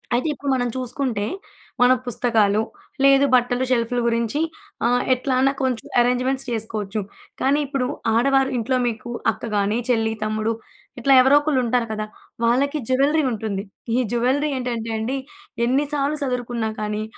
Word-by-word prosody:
అయితే 250 +6 0
ఇప్పుడు 285 0 -5
మనం 245 -1 0
చూసుకుంటే, 250 -3 -2 0.6
మన 245 +1 +6 0.2
పుస్తకాలు, 220 -4 +2 0.4
లేదు 275 0 +6
బట్టలు, 245 0 +2
షెల్ఫులు 240 0 +1
గురించి 230 +4 0 0.5
ఆహ్, 245 +1 +2
ఎట్లన్నా 260 +1 +1
కొంచెం 255 -3 -1
అరేంజ్‌మెంట్స్ 255 +2 +1
చేసుకోవచ్చు. 220 -2 -3 0.4
కానీ 280 +2 +3
ఇప్పుడు 270 -2 -1 0.3
ఆడవారు 270 +2 +3
ఇంట్లో 250 +3 0
మీకు 235 +1 -4 0.2
అక్క 225 - -8
గాని, 205 +2 +1
చెల్లి, 225 -2 +2
తమ్ముడు 215 +1 -1 0.5
ఇట్లా 270 +3 +4
ఎవరో 270 +3 +6
ఒకళ్లుంటారు 250 -5 +1
కదా! 215 0 -3 0.4
వాళ్లకి 270 +6 +2
జ్యువెల్లరీ 280 +4 +3
ఉంటుంది. 210 -3 -3 0.3
ఈ - - +2
జ్యువెల్లరీ 255 +5 +1
ఏంటంటే 235 -3 -3
అండి, 235 +5 -2 0.5
ఎన్నిసార్లు 285 +3 0
సదురుకున్నా 245 -3 -2
కానీ, 210 0 -2
245 Hz, 135 wpm, -22 LUFS, 225-270 Hz, 0.6 s, మన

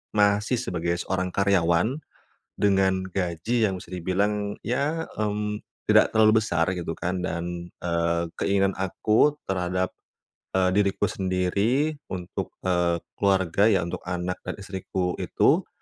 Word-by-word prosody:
masih 105 +3 +3
sebagai 85 -6 -1
seorang 95 -1 -2
karyawan 95 - +2 0.6
dengan 95 -2 +2
gaji 95 +6 0
yang 95 - -2
bisa 90 - -16
dibilang 100 +3 -1
ya, 145 +7 0 0.2
mmm, 105 0 -1 0.3
tidak - - +5
terlalu 110 0 +6
besar 85 -5 0
gitu 85 -3 -3
kan. 90 +1 -2
Dan, 85 0 -4 0.2
eee, 85 0 +1 0.2
keinginan 100 -1 +2
aku 110 +9 +2
terhadap, 90 -1 -1 0.6
eee, 95 -1 +3
diriku 100 0 +1
sendiri, 100 +11 0
untuk, 90 -2 -5
eee, 90 -2 +2 0.2
keluarga 95 0 +3
ya, 95 -6 +3
untuk 85 +1 -4
anak 90 0 -2
dan - - -3
istriku 95 -2 -3
itu, - - +2
95 Hz, 125 wpm, -25 LUFS, 90-105 Hz, 0.6 s, terlalu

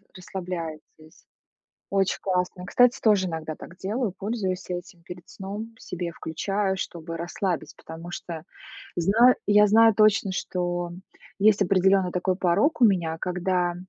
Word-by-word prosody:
расслабляетесь. 170 -4 -8 0.6
Очень 195 -1 +1
классно. 180 -1 -1
Кстати, 245 +5 +4
тоже 205 -4 +3
иногда 160 -2 -4
так 175 - -12
делаю, 210 +2 -2
пользуюсь 195 -3 -3
этим 175 -1 -7
перед 175 0 -10
сном, 205 +4 -7
себе 175 -1 -5
включаю, 195 +5 -2
чтобы 165 -2 -5
расслабить, 175 0 -3
потому 165 +2 -9
что 165 -2 -6 0.5
знаю 225 +9 +5
я 210 0 +6
знаю 225 +2 +6
точно, 215 -2 +4
что 175 -2 -2 0.5
есть 210 0 +4
определённый 190 0 +3
такой 180 +1 0
порог 190 - +1
у - - +9
меня, 170 -6 +1
когда 180 0 0
185 Hz, 130 wpm, -25 LUFS, 175-200 Hz, 0.6 s, у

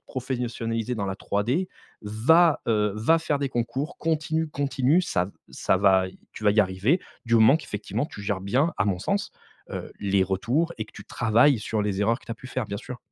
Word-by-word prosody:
te - - -56
professionnaliser 120 -2 -2
dans 100 -3 -3
la 95 - -2
3D. 120 - -1 0.3
Va, 145 +11 +4
heu, 105 -2 +2
va 160 +10 +3
faire 150 -2 -1
des 140 -1 -1
concours, 130 +6 -3
continue, 160 0 0
continue. 140 +3 +1
Ça 90 - 0
v 100 - -13 0.2
ça - - +1
va 95 -1 +4 0.3
tu 110 - -9
vas 105 - +6
y 105 - +5
arriver, 100 - +1 0.3
du 115 - +2
moment 110 +7 +6
qu’effectivement 110 +1 -4
tu 100 - -10
gères 100 -1 -2
bien, 130 - +1
à 95 - +3
mon 95 -3 0
sens, 200 - -1 0.4
heu, - - -6
les 100 -1 +2
retours 120 - 0
et 110 - -2
que - - -20
tu - - -11
travailles 120 +2 +3
sur 105 +1 -2
les 100 -1 -1
erreurs 115 +4 +2
que - - -20
tu 115 - -4
as - - -5
pu 130 - -12
faire, 130 -2 -2
bien 100 - -4
sûr! 125 +2 -8
115 Hz, 215 wpm, -25 LUFS, 105-145 Hz, 0.4 s, vas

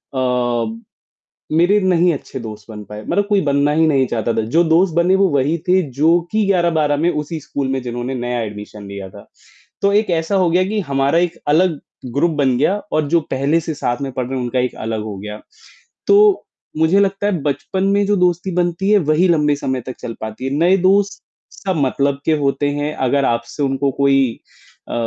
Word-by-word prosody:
अ 120 -3 -1 0.7
मेरे 175 +6 +3
नहीं 180 -2 +3
अच्छे 135 -2 -7
दोस्त 110 -3 -8
बन 105 -1 -8
पाए, 105 +2 -9
मतलब 200 +3 +1
कोई 205 -2 +3
बनना 140 -1 +1
ही 160 +1 +3
नहीं 135 -4 +3
चाहता 115 0 -1
था, - - +2
जो 130 +11 +2
दोस्त 170 +2 +3
बने 175 +2 +3
वो 195 0 +3
वही 140 +5 +1
थे 185 +1 +4 0.2
जो 165 +3 +4
कि 215 -1 +1
11-12 165 -6 +2
में 175 - +3
उसी 150 +1 -4
स्कूल 140 -1 -3
में 135 -1 -1
जिन्होंने 120 +2 -4
नया 120 0 -2
एडमिशन 105 -1 -8
लिया 100 -1 -7
था, - - -14 0.5
तो 200 - +3
एक 210 0 +2
ऐसा 165 +3 0
हो 185 -3 +3
गया 180 +2 +3
कि 215 0 -1
हमारा 140 -1 0
एक 175 -1 -1
अलग 160 +1 +2 0.4
ग्रुप 165 +4 +2
बन 130 -4 +2
गया 165 +9 +2 0.2
और 155 -1 +1
जो 170 +2 +4
पहले 140 +5 +1
से 160 - -4
साथ 120 -2 -2
में 135 -1 -3
पढ़ 125 -1 -3
रहे 135 - -4
हैं, 125 - -2
उनका 125 +1 -1
एक 125 0 -1
अलग 110 -1 -3
हो 105 -2 -6
गया। 105 +2 -7 0.7
तो 410 -1 +5 0.3
मुझे 160 +5 +3
लगता 200 0 +1
है 185 -7 -1
बचपन 145 +6 -2
में 205 0 +2
जो 205 +1 +2
दोस्ती 180 +1 +1
बनती 175 +2 0
है 210 - +6
वही 170 +5 +3
लंबे 150 -3 +3
समय 130 -2 -3
तक 130 - -5
चल 115 - -5
पाती 110 +3 -6
है, 135 - -2
नए 175 +4 +4
दोस्त 200 +3 +2 0.3
सब 190 -2 -3
मतलब 140 +1 0
के - - +2
होते 145 0 0
हैं 150 +1 -2
अगर 140 +2 +2
आपसे 120 +5 -2
उनको 135 0 0
कोई 135 -3 +2 0.5
अ, - - -5
145 Hz, 210 wpm, -18 LUFS, 125-180 Hz, 0.7 s, है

